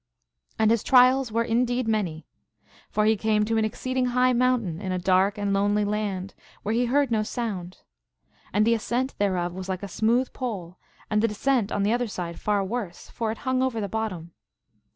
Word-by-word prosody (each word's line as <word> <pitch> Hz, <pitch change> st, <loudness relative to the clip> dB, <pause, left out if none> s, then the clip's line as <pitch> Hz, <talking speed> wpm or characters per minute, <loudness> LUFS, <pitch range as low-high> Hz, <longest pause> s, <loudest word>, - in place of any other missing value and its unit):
And 220 Hz, 0 st, +3 dB
his 230 Hz, -2 st, +2 dB
trials 255 Hz, -1 st, +5 dB
were 230 Hz, +1 st, +1 dB
in 230 Hz, +1 st, +2 dB
deed 245 Hz, -1 st, -1 dB
many. 185 Hz, -8 st, -1 dB, 0.6 s
For 210 Hz, -, +1 dB
he 220 Hz, +1 st, +4 dB
came 215 Hz, 0 st, +1 dB
to 225 Hz, +1 st, 0 dB
an -, -, +1 dB
exceeding 255 Hz, +3 st, -1 dB
high 250 Hz, +1 st, +3 dB
moun 250 Hz, 0 st, +2 dB
tain 170 Hz, -2 st, -5 dB
in 190 Hz, -2 st, -3 dB
a 185 Hz, -, 0 dB
dark 190 Hz, +3 st, +2 dB
and 205 Hz, -1 st, -1 dB
lonely 205 Hz, +1 st, +2 dB
land, 205 Hz, -2 st, -2 dB, 0.3 s
where 215 Hz, -, -1 dB
he 240 Hz, +2 st, +2 dB
heard 275 Hz, +1 st, +2 dB
110 215 Hz, -2 st, +1 dB
sound. 195 Hz, -7 st, -4 dB, 0.7 s
And 210 Hz, +1 st, +3 dB
the 230 Hz, -, +4 dB
ascent 240 Hz, +4 st, -1 dB
thereof 180 Hz, -4 st, 0 dB
was 190 Hz, +1 st, -7 dB
like 185 Hz, +1 st, -3 dB
a -, -, -3 dB
smooth 230 Hz, +6 st, +1 dB
pole, 190 Hz, -9 st, -5 dB, 0.3 s
and 210 Hz, 0 st, +3 dB
the 230 Hz, -, +3 dB
descent 225 Hz, 0 st, 0 dB
on 200 Hz, -, 0 dB
the 210 Hz, +3 st, +2 dB
other 245 Hz, 0 st, 0 dB
side 175 Hz, -4 st, -5 dB
far 205 Hz, -2 st, +1 dB
worse, 200 Hz, -4 st, -5 dB
for 225 Hz, -2 st, -2 dB
it 220 Hz, -, -6 dB
hung 260 Hz, 0 st, +1 dB
over 260 Hz, -3 st, 0 dB
the 205 Hz, -, -2 dB
bottom. 185 Hz, -5 st, -4 dB
215 Hz, 205 wpm, -25 LUFS, 195-240 Hz, 0.7 s, trials